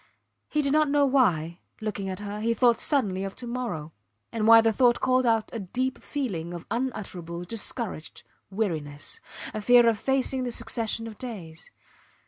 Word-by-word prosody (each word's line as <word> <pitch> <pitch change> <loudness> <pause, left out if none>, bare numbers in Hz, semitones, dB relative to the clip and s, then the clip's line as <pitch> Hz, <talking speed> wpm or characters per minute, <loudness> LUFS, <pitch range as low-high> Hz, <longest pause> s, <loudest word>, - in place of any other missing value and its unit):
He 300 0 +1
did 275 0 +2
not 305 -1 +4
know 285 0 +4
why, 180 - +2 0.2
looking 205 -3 -3
at 190 +2 -5
her, 205 0 -5
he 230 +2 0
thought 235 0 +4
suddenly 205 -10 +1
of 195 0 -5
to 250 - -8
morrow, 220 -11 -4 0.4
and 220 -1 0
why 230 0 +10
the 225 0 +3
thought 240 +1 +4
called 255 -1 +2
out 225 -2 +1
a 230 - -3
deep 250 +7 -2
feeling 180 - -3
of 170 - -8
unutterable, 190 -9 -3
discouraged 205 -3 -5 0.3
weariness 160 -8 -3 0.3
a 215 - -3
fear 240 +2 +6
of 225 -3 +2
facing 265 0 0
the 250 - -2
succession 230 -1 -2
of 220 -2 -9
days. 180 -10 -7
225 Hz, 170 wpm, -27 LUFS, 190-250 Hz, 0.4 s, why